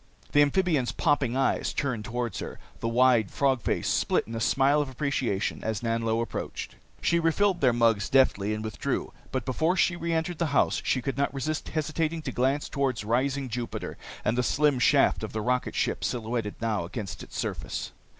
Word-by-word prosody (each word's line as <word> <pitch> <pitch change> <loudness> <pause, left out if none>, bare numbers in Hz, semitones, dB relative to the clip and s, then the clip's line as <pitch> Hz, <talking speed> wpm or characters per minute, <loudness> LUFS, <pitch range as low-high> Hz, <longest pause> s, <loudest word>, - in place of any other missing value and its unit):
The 145 - +5
amphibian's 145 -3 +2
popping 135 -5 +1
eyes 135 - +1
turned 120 -7 -2
toward 120 -3 -3
her, - - -6 0.2
the 115 - -2
wide 120 -3 +4
frog 135 -3 +1
face - - -1
split - - +1
in 115 - -8
a 115 - -2
smile 135 +5 +3
of 145 - -3
appreciation 130 -6 -1
as 110 -1 -2
Nanlo 115 0 0
approached. - - -5 0.3
She 170 - +3
refilled 175 +3 +2
their 130 -3 +5
mugs 115 -3 +2
deftly 110 -6 +3
and 110 - -5
withdrew. 110 -1 -3 0.2
But 130 -3 -2
before 160 +8 +1
she 175 - +3
reentered 170 0 -2
the 170 - +1
house - - +2
she 130 - 0
could 135 -1 -3
not 140 - +1
resist 150 +2 -3
hesitating 155 +1 -1
to 130 - -3
glance 135 +4 +1
toward 135 -5 -1
rising 135 +5 0
Jupiter 120 0 -4 0.3
and 110 - +2
the 125 - +2
slim 145 +1 +2
shaft - - +4
of - - -5
the 110 - -2
rocketship 125 +3 0
silhouetted 115 -3 -2
now 110 -5 0
against 95 0 -6
its - - -9
surface. - - -3
130 Hz, 180 wpm, -27 LUFS, 115-145 Hz, 0.3 s, The